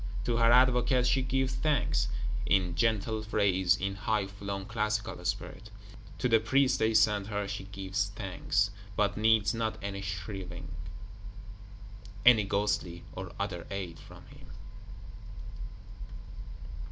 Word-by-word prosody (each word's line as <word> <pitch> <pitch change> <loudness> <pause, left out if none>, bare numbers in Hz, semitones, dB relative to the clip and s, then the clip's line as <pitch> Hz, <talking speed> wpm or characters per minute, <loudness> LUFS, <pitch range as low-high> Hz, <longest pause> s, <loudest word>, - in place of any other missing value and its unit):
To 120 -1 0
her 115 0 +5
Advocate 125 0 +4
she 130 +1 +3
gives 130 0 0
thanks; 105 - +1 0.4
in 95 -4 +2
gentle 110 +3 0
phrase, 100 -4 +2
in 95 0 -2
high 100 +1 0
flown 100 0 -6
classical 110 -3 -2
spirit. 105 - -4 0.5
To 125 - 0
the 115 -2 +5
Priest 130 +4 +2
they 110 0 +2
send 105 -2 +3
her 105 -1 -2
she 95 - -5
gives 95 0 -3
thanks; 100 0 0 0.2
but 100 0 +1
needs 110 0 +3
not 115 -1 -2
any 100 0 -5
shriving, 90 -2 -6 1.6
any 115 -4 +7
ghostly 100 -4 -1
or 90 -1 -7
other 95 -4 -3
aid 95 -4 -5
from - - -14
him. - - -15
105 Hz, 125 wpm, -30 LUFS, 95-115 Hz, 1.6 s, any